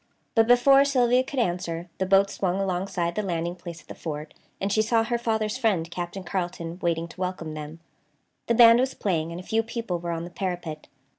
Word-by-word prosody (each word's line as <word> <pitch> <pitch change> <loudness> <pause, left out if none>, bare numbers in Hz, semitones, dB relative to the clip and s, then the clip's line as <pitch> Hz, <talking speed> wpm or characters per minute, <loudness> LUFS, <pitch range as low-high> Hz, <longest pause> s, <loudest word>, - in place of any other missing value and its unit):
But 225 -1 +4
before 270 +3 +6
Sylvia 255 -2 +3
could 270 +1 -8
answer, 175 -5 -1
the 190 - 0
boat 195 +1 +4
swung 185 0 -1
alongside 180 -2 -1
the 210 - -1
landing 175 -3 -2
place 170 -1 -9
at - - -31
the - - -7
fort 150 -1 -6 0.3
and 195 +1 -1
she 215 - +4
saw 225 +1 +2
her 235 +1 -1
father's 220 0 -1
friend, 185 -9 +1
Captain 175 +2 -5
Carleton, 175 -2 -4
waiting 170 -1 0
to 175 +3 -12
welcome 180 -4 -3
them. 155 +1 -7 0.7
The 235 - +2
band 230 0 +8
was 260 +1 0
playing, 165 -5 -1
and 170 - -6
a - - -8
few 225 0 +1
people 225 -6 -4
were 170 0 -5
on 165 -1 -2
the 175 - -8
parapet. 175 -5 -4
185 Hz, 210 wpm, -26 LUFS, 170-225 Hz, 0.7 s, band